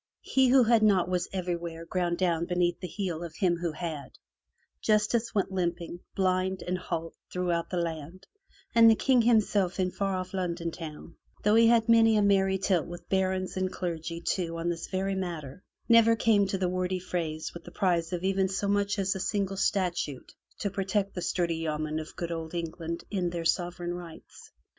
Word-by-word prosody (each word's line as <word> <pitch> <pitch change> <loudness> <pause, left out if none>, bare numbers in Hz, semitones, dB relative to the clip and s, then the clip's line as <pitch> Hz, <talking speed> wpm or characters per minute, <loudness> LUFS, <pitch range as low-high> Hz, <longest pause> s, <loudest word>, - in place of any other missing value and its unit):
He 265 -1 +3
who 255 0 +6
had 230 -1 +4
naught 195 -5 +4
was 180 0 0
everywhere 170 -3 -4
ground 175 0 -1
down 170 -2 +1
beneath 175 -1 0
the 180 - -5
heel 175 -3 -3
of 170 - -8
him 180 -4 +1
who 170 -1 -2
had; 155 -5 -6 0.6
Justice 220 +2 +1
went 200 -1 +1
limping, 175 -2 -2 0.2
blind, 185 0 0
and 180 - -2
halt, 165 -2 -4 0.2
throughout 175 -2 -1
the 180 - -2
land, 170 +2 -4 0.5
and 230 -1 +8
the 225 - +6
King 255 +1 +3
himself 210 -5 +2
in 185 -1 +1
far 195 0 -1
off 185 0 -4
London 170 -2 -2
town, 165 0 -9 0.3
though 210 - +4
he 230 +1 +6
had 230 -1 +4
many 225 -1 +6
a 210 - +3
merry 195 -1 +3
tilt 185 -3 +1
with 175 0 -10
barons 190 -1 0
and 185 0 0
clergy 170 -2 -4
too 170 -1 -2
on 165 +1 -1
this 165 -1 -3
very 195 +1 -1
matter, 170 -5 -5 0.3
never 230 -1 +6
came 215 -2 +3
off - - -5
from 195 - -2
the 180 - +2
wordy 185 0 -1
frays 165 -4 -4
with 170 - -9
the - - -10
prize 175 -3 0
of 180 -1 -3
even 190 0 +1
so 195 +1 -1
much 205 +1 +1
as 195 -1 +1
a 190 - -5
single 195 0 -1
statute 180 -8 -1 0.2
to 200 - -2
protect 195 +1 -1
the 180 - -4
sturdy 170 -2 0
yeomen 155 -1 -2
of 155 - -8
good 170 -1 -4
old 165 0 -5
England 170 0 -4
in 185 -4 0
their 170 -1 -4
sovereign 175 0 -1
rights. 175 -2 -11
180 Hz, 195 wpm, -28 LUFS, 170-195 Hz, 0.6 s, and